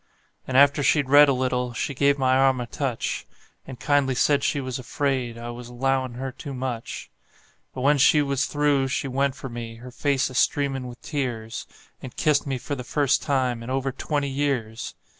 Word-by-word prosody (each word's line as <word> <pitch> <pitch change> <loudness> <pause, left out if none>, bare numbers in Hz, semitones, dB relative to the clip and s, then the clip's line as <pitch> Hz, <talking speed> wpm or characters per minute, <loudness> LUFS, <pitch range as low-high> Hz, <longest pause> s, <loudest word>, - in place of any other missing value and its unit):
And 130 - +1
after 140 +1 +6
she'd 140 -1 +2
read 145 0 +8
a - - +5
little 125 -1 -1
she 140 +5 -2
give 140 +1 +3
my 130 -1 +3
arm 135 -1 +3
a 120 - -3
touch, 125 -1 -3 0.4
And 130 -2 -9
kindly 140 -3 +2
said 140 +2 +2
she 145 - +1
was 130 -1 -4
afraid 130 -2 -2
I 120 +1 -6
was 120 0 -9
'lowin' 130 0 -1
her 130 +1 -4
too 140 +1 -8
much; 125 -3 -5 0.6
But 130 - -4
when 145 +2 +3
she 150 +3 +6
was 140 -1 0
through 145 -2 +2
she 135 +1 -2
went 135 +1 0
for 135 0 -7
me, 120 -2 -7
her 125 +2 -11
face 135 0 0
a - - -9
streamin' 135 0 +1
with 125 0 -10
tears, 120 -7 -4 0.3
And 130 - -9
kissed 150 -3 +2
me 135 -1 -1
for 135 - -5
the 130 -3 -4
first 140 +2 +1
time 130 -4 0
in 115 - -7
over 135 +1 -1
twenty 145 +2 -2
years! 135 -5 -2
135 Hz, 195 wpm, -24 LUFS, 125-140 Hz, 0.6 s, read